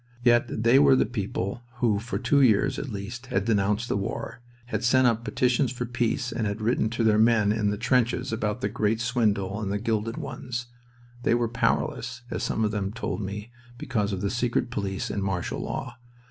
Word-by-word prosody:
Yet 120 -2 +3
they 120 +3 +6
were 140 -2 +6
the - - +3
people 100 -1 -3
who 115 -4 +1
for 115 +4 -4
two 140 -1 +3
years 110 -6 +3
at 140 - -5
least 115 +4 -6
had 100 -6 0
denounced 105 +1 +1
the - - 0
war, 100 +4 -4 0.2
had 110 -2 -3
sent 130 +2 +4
up 115 -1 +2
petitions 125 +1 +1
for 125 -1 -3
peace, 120 +1 -1
and 110 -3 -1
had 100 +2 -3
written 110 0 +1
to 115 +1 -1
their 110 -1 +4
men 110 -2 +4
in 105 -1 +1
the 105 - -1
trenches 125 +1 +1
about 110 +1 -2
the - - +1
Great 110 0 0
Swindle 105 -4 0
and 100 -2 -2
the 100 - 0
Gilded 115 +1 -1
Ones. 125 -5 -5 0.6
They 120 - +3
were 120 -1 +1
powerless, 115 +1 -1
as - - -2
some 110 - 0
of 105 - 0
them 100 -2 -2
told 115 0 -3
me, 105 +3 -5 0.3
because 105 -4 -1
of 95 -2 -3
the 100 - -1
secret 120 0 0
police 100 -4 -3
and 100 - -2
martial 95 -3 -2
law. 120 -2 -5
115 Hz, 200 wpm, -26 LUFS, 105-120 Hz, 0.6 s, they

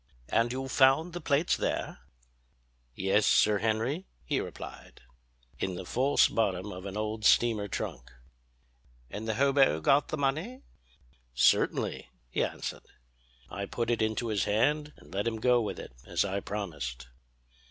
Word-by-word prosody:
"And 115 +1 +2
you 130 +1 -3
found 135 +6 +4
the 175 - -5
plates 145 +3 +2
there?" - - -2 1.0
"Yes, 95 +2 +2
Sir 105 -1 +4
Henry," 115 - -1 0.2
he - - 0
replied, - - -9 0.6
"in 95 -1 -2
the 90 - -6
false 135 +8 +3
bottom 100 -2 -1
of 90 +2 -7
an 100 +1 -6
old 110 0 -3
steamer 110 -2 +4
trunk." 95 - -5 1.0
"And 105 +3 -5
the 110 - 0
hobo 135 - +4
got 135 - +3
the 155 - -3
money?" 160 - -2 0.7
"Certainly," - - +2 0.2
he - - +1
answered. - - -5 0.6
"I 100 0 -4
put 120 0 -2
it 120 - 0
into 110 +2 0
his 105 -3 0
hand, 150 +8 +1
and - - -16
let 100 +3 -1
him 115 - -1
go 125 +1 +4
with 110 - -3
it, - - -9 0.2
as - - +1
I 100 0 -1
promised." 70 -13 -5
110 Hz, 150 wpm, -29 LUFS, 100-135 Hz, 1.0 s, found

